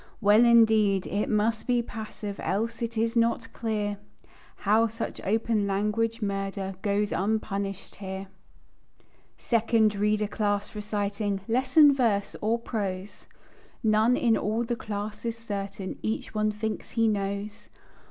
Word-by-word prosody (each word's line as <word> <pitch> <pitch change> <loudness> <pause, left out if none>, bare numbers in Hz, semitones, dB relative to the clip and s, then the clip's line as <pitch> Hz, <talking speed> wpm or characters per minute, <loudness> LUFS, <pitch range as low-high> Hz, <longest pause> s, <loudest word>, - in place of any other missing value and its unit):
Well, 215 +2 +6
indeed, 220 -4 +5
it 205 +2 -1
must 220 +1 +1
be 245 -1 +2
passive, 215 -3 -7
Else 225 +3 -2
it 230 -1 -3
is 230 +1 0
not 230 0 +1
clear 210 -3 -2 0.6
How 220 +3 +3
such 225 +1 -5
open 220 0 +1
language 210 +3 0
murder, 195 -1 -2
Goes 205 0 0
unpunished 195 -1 -2
here. 190 -1 -5 1.1
"Second 225 -2 +2
Reader 210 +1 +1
Class" 205 -1 -1
reciting 205 -1 -2
"Lesson 265 +5 +5
verse 225 -7 +1
or 225 +2 +2
prose?" 200 -4 -5 0.6
None 220 +3 +4
in 230 -3 +3
all 220 +3 0
the 240 0 -2
class 210 -1 -5
is 230 -1 -3
certain; 200 -3 -5
Each 220 0 -3
one 215 0 +1
thinks 215 +1 -4
he 230 -1 +2
knows. 200 0 -3
215 Hz, 130 wpm, -27 LUFS, 200-230 Hz, 1.1 s, Well